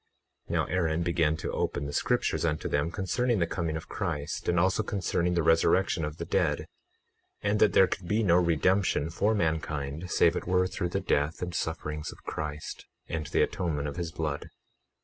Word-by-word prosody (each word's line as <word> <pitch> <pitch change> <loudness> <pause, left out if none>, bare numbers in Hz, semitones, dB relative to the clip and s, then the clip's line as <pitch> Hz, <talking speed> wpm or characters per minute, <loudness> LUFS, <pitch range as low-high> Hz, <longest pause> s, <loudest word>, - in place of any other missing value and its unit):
21:9 - - -4
Now - - +2
Aaron 85 -2 0
began 80 -2 +1
to - - -4
open 70 - -1
the 70 - -5
scriptures - - +1
unto 80 -2 0
them 75 +3 0
concerning 110 +7 0
the 85 - +2
coming 85 -2 -2
of 80 - -8
Christ, 80 -8 -3
and 85 0 +3
also 95 +4 +3
concerning 90 -4 0
the 85 - +2
resurrection 80 +2 +3
of 75 +1 -4
the - - -4
dead, - - +1 0.8
and 105 +1 +1
that 105 - +5
there 95 - +7
could 95 -1 -4
be 110 +4 +1
no 85 -4 +5
redemption 90 -1 +2
for 105 +6 +1
mankind 80 -2 -2
save 85 -1 +4
it - - -4
were 90 0 +3
through 90 -1 -2
the - - -1
death 75 +5 0
and 90 -1 -4
sufferings 75 -2 -3
of - - -15
Christ, 75 0 -5 0.2
and 80 -3 -3
the - - +2
atonement 75 -5 -1
of 70 - -6
his 85 -2 -3
blood. 75 -3 -3
85 Hz, 190 wpm, -29 LUFS, 75-90 Hz, 0.8 s, there